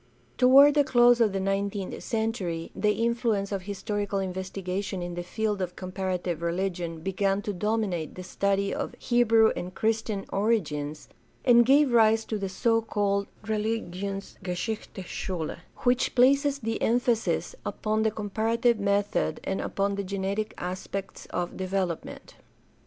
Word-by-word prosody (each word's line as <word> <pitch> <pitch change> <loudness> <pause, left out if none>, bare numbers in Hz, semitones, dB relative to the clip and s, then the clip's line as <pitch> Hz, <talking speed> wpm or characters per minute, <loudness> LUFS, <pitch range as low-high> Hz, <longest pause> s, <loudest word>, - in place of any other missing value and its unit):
Toward 275 +3 +7
the 290 0 +4
close 240 -2 +5
of 220 -3 +4
the 195 - -2
nineteenth 195 0 -2
century 215 -8 -2
the 210 -1 +2
influence 230 -4 0
of 195 -2 -2
historical 205 +1 -3
investigation 190 0 -3
in 175 0 -5
the 175 - -4
field 210 +3 -2
of 180 -1 -3
comparative 185 -2 -3
religion 170 -1 -2
began 195 +2 0
to 205 - -3
dominate 195 -5 -1
the 185 - -7
study 200 +1 0
of - - -4
Hebrew 225 -2 +4
and 180 +1 -6
Christian 220 -2 -1
origins 155 -9 -1 0.4
and 240 -1 +6
gave 280 0 +5
rise 225 -1 +5
to 215 - -3
the 195 -1 -3
so 225 +4 +2
called 200 -2 0 0.2
religionsgeschichtUche 200 -2 -3
Schule, 175 -3 -4 0.3
which 250 0 +2
places 275 +3 +4
the 225 -4 -3
emphasis 240 - +1
upon 215 0 -1
the 220 - +3
comparative 220 +2 0
method 200 0 0
and 190 - -2
upon 200 0 -1
the 200 0 -2
genetic 200 +2 -3
aspects 185 +2 -5
of 175 -1 -3
development. 185 -3 -3
200 Hz, 135 wpm, -27 LUFS, 185-225 Hz, 0.4 s, Toward